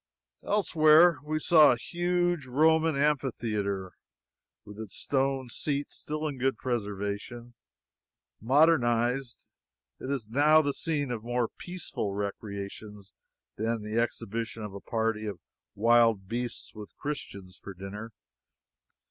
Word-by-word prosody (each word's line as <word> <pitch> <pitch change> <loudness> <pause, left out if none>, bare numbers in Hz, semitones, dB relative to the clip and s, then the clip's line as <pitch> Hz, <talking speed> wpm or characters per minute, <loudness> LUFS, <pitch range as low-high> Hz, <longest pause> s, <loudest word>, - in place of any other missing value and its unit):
Elsewhere 165 -4 +5
we 155 +1 -2
saw 155 -3 +6
a - - -3
huge 175 0 -1
Roman 160 +4 +3
amphitheatre, 110 -9 -1 0.7
with 105 +1 -11
its 110 -4 -8
stone 135 -1 -1
seats 145 +3 -3
still 155 +1 -4
in 140 -3 -5
good 130 -2 +1
preservation. 110 +1 -4 0.9
Modernized, 125 -2 +2 0.5
it 130 - -6
is 135 -6 -2
now 150 +6 +5
the 140 -1 0
scene 145 -5 -2
of 115 -3 -4
more 120 0 -1
peaceful 170 - -5
recreations 100 0 -6 0.4
than 110 0 -1
the 110 +2 0
exhibition 115 -1 -4
of 105 -2 -6
a 100 - -8
party 110 -2 -1
of 100 -4 -5 0.4
wild 115 -2 +4
beasts 120 +2 -4
with 105 -2 -11
Christians 100 -10 -6
for 95 - -9
dinner. 100 +4 -7
120 Hz, 120 wpm, -29 LUFS, 105-145 Hz, 0.9 s, saw